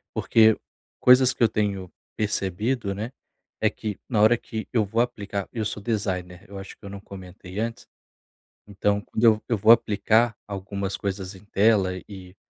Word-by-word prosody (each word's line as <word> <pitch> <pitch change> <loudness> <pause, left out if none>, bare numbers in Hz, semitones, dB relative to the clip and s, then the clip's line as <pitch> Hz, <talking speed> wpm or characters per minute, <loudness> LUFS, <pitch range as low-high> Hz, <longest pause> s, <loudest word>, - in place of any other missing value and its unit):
porque 110 -1 +4 0.4
coisas 125 0 +6
que 125 - 0
eu - - +7
tenho 100 -4 -2 0.2
percebido, 105 +1 -1
né, 110 +5 -5 0.5
é - - +4
que 105 -3 -6
na 115 -5 +1
hora 110 +3 +6
que 110 -1 -6
eu 115 -3 +3
vou 110 +4 -2
aplicar 100 -5 -3
eu 115 - -2
sou 105 0 -4
designer, 95 -5 -3
eu 100 - -8
acho 95 - -10
que - - -37
eu - - -7
não 100 0 -8
comentei 95 -1 -9
antes, 115 +1 -4 0.8
então 100 0 0
quando 110 - -4
eu-eu 115 +1 +4
vou 110 +3 +6
aplicar 110 0 +3
algumas 100 0 -4
coisas 95 -1 -4
em 95 +2 -16
tela 100 -2 +3 0.2
e 95 -2 -11
105 Hz, 170 wpm, -25 LUFS, 95-110 Hz, 0.8 s, eu